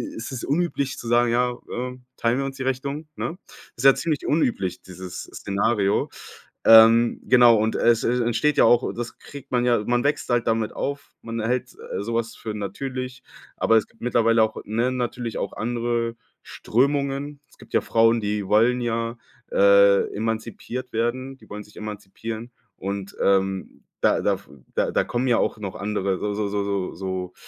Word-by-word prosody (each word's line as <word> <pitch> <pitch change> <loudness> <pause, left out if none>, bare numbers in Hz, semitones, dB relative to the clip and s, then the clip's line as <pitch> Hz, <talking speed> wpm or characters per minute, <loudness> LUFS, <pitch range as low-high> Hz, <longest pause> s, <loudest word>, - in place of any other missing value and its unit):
ist 115 +3 -6
es 130 -3 -5
unüblich 145 -3 -1
zu 120 - -7
sagen: 120 0 +3
„Ja, 125 0 +1 0.2
ähm, 125 +1 -5
teilen 115 +2 +1
wir 135 - -1
uns 135 -1 -6
die - - -7
Rechnung?“, 140 +4 -3
ne? 175 - -4 0.4
Ist 120 - -5
ja 135 - +8
ziemlich 155 -4 -2
unüblich, 95 - 0
dieses 90 0 -8
Szenario. 100 0 0 0.6
Ähm, 115 +1 +7
genau, 120 -2 +7
und 110 +1 0
es 115 -1 +3
e 125 +1 +1
entsteht 120 +6 +1
ja - - +6
auch 120 +2 +3
das 120 0 -6
kriegt 140 -2 -12
man 125 -1 +2
ja 120 -3 +2
man 120 0 +1
wächst 145 +1 0
halt 120 -1 +2
damit 115 -1 0
auf. 140 0 -4
Man 115 0 -4
hält 125 +3 -2 0.2
so 110 +4 -3
was 115 0 -2
für 110 - -6
natürlich, 125 +5 -5 0.3
aber 115 - +4
es 110 - +1
gibt - - -29
mittlerweile 115 -1 +3
auch, 110 0 -2
ne, 115 +4 0
natürlich 120 -2 -3
auch 100 - -3
andere 120 0 -1 0.3
Strömungen. 140 +3 -1
Es - - -23
gibt - - -17
ja - - +3
Frauen, 115 0 +3
die 105 -1 -2
wollen 115 +5 +4
ja, 115 0 -2 0.3
äh, 100 0 +5
emanzipiert 115 +3 -4
werden 125 +4 -1
die - - -20
wollen 105 0 -7
sich 105 - -20
emanzipieren. 110 +2 -7 0.3
Und, 100 0 -5
ähm, 95 -1 0 0.2
da - - +3
da - - +2
f - - -15 0.3
da - - +1
kommen 125 +2 -1
ja 120 - +4
auch - - 0
noch 100 -4 -6
andere 100 0 -1
so 105 0 -2
so 105 0 -1
so 100 0 -1
so 100 -2 -2
so, 95 0 -4
115 Hz, 180 wpm, -24 LUFS, 105-125 Hz, 0.6 s, ja